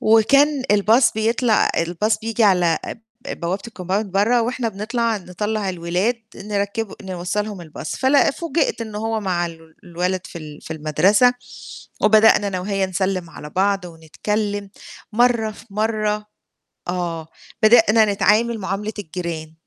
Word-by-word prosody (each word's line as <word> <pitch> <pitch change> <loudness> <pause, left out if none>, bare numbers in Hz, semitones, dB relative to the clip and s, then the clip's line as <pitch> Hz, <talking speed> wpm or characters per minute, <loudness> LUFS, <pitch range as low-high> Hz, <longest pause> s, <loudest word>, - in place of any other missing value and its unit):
وكان 275 +6 +4
الBus 215 +5 +4
بيطلع 225 +1 +2
الBus 175 +6 0
بييجي 225 0 +1
على 180 -5 +3 0.5
ب - - -6
بوابة 175 +4 -2
الCompound 195 +1 -2
برّه 210 +5 +2
وإحنا 240 0 -2
بنطلع 225 +2 -1
نطلَّع 205 +2 -3
الولاد 180 +7 -1
نركِّبه 205 +1 -3
نوصَّلهم 190 +1 -3
الBus 155 -1 -6
فلأ 270 +2 +4
فوجئت 330 -2 -1
إن 220 -2 -6
هو 220 +1 -2
مع 180 -3 -1
ال 165 -1 -12
الولد 180 +2 -2
في 170 - -9
ال 150 -2 -10
في - - -6
المدرسة 185 - +3 0.7
وبدأنا 215 -1 +5
أنا 185 -2 -2
وهي 195 +1 -1
نسلم 185 -2 -2
على 150 - -10
بعض 195 +2 0
ونتكلم 200 +5 -3 0.4
مرّة 235 -1 +2
في 205 +1 -14
مرّة 210 0 -1 0.6
آه، 170 -3 -3 0.4
بدأنا 220 0 +6
نتعامل 220 +3 +2
معاملة 195 +3 -3
الجيران 165 -3 -5
205 Hz, 130 wpm, -21 LUFS, 180-220 Hz, 0.7 s, بدأنا